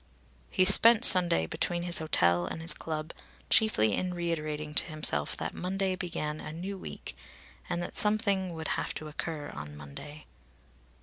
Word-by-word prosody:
He 185 - +2
spent 225 +4 +7
Sunday 175 - +7
between 175 - -3
his 175 -1 +1
hotel 85 - +1
and - - -5
his 165 +1 +2
club, 155 0 -5 0.4
chiefly 110 - +3
in 180 - -2
reiterating 155 -3 -3
to - - +1
himself 155 - -1
that - - -4
Monday 190 +1 -2
began 155 -4 -4
a - - -7
new 180 +5 -6
week 190 - -8 0.5
and 175 - -2
that - - -7
something 200 -4 0
would 160 0 -5
have - - -2
to 155 - -6
occur 150 -1 -6
on 75 0 -8
Monday. 145 - -10
165 Hz, 160 wpm, -29 LUFS, 150-185 Hz, 0.5 s, spent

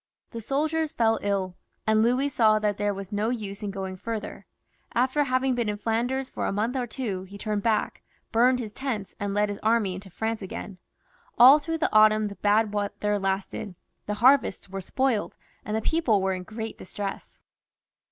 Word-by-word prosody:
The 230 - -6
soldiers 305 +6 0
fell 225 -5 +2
ill, 195 -3 -1 0.3
and 220 0 +3
Louis 250 +5 +2
saw 220 -5 +4
that 210 -1 0
there 205 0 0
was 195 0 -7
no 210 +2 0
use 210 -4 -4
in 205 - -3
going 190 -1 -5
farther. 220 +1 -6 0.5
After 260 +4 +2
having 255 0 +1
been 240 -3 -1
in 205 - -2
Flanders 240 +5 -1
for - - -3
a - - 0
month 220 +6 -1
or 250 -2 -1
two, 220 -6 -4
he 200 +2 -11
turned 210 0 -2
back, 220 0 0 0.3
burnt 245 +3 +4
his 220 -4 -5
tents, 215 -6 -4
and 200 0 -2
led 210 0 +3
his 205 - -5
army 220 -3 +2
into 190 +2 -8
France 220 +4 -3
again. 190 0 -7 0.6
All 265 +5 +9
through 325 +2 -3
the 315 - 0
autumn 215 0 +5
the 200 - -9
bad 210 +1 +2
weather 205 0 -1
lasted; 195 0 -3 0.3
the 210 - -1
harvests 250 -4 +3
were 195 0 -5
spoiled, 250 +2 -1 0.3
and 215 +1 -2
the - - -1
people 290 -11 +2
were 190 0 0
in 185 - -4
great 220 +3 -7
distress. 195 +1 -6
215 Hz, 190 wpm, -26 LUFS, 200-245 Hz, 0.6 s, All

